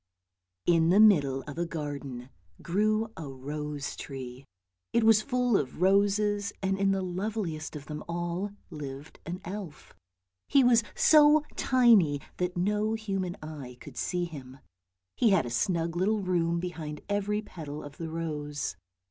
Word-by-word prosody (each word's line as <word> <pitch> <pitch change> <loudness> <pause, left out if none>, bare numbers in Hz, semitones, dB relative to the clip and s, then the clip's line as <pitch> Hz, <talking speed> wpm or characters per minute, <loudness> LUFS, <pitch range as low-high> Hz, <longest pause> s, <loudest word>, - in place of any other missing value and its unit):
IN 165 -1 +4
the 190 +4 +5
middle 145 -11 +5
of 150 +2 -7
a 170 - +1
garden 140 -5 -6 0.3
grew 215 +4 +1
a 160 -3 -7
rose 145 +1 -5
tree; 130 -1 -8 0.5
it 235 - +3
was 220 -1 +6
full 250 -1 +1
of 135 -6 -1
roses, 200 +2 +2
and 190 0 +1
in 195 0 +3
the 195 -1 +1
loveliest 185 -4 -3
of 145 -1 -7
them 150 0 -6
all 175 +3 -2 0.2
lived 145 -1 -8
an 175 +2 -4
elf. 185 -4 -7 0.5
He 275 - +5
was 235 -2 +5
so 300 -1 +6
tiny 225 - +4 0.2
that 180 0 -2
no 210 +4 +1
human 195 -5 -3
eye 140 -6 -8
could - - -11
see 180 -1 -1
him. 135 -6 -9 0.6
He 235 - +4
had 190 -8 +3
a 120 - -5
snug 170 - 0
little 205 +4 +1
room 170 -2 +1
behind 160 -4 -5
every 205 +1 -1
petal 150 -7 -7
of 145 0 -10
the 165 -1 -5
rose. 150 - -3
175 Hz, 150 wpm, -29 LUFS, 150-205 Hz, 0.6 s, was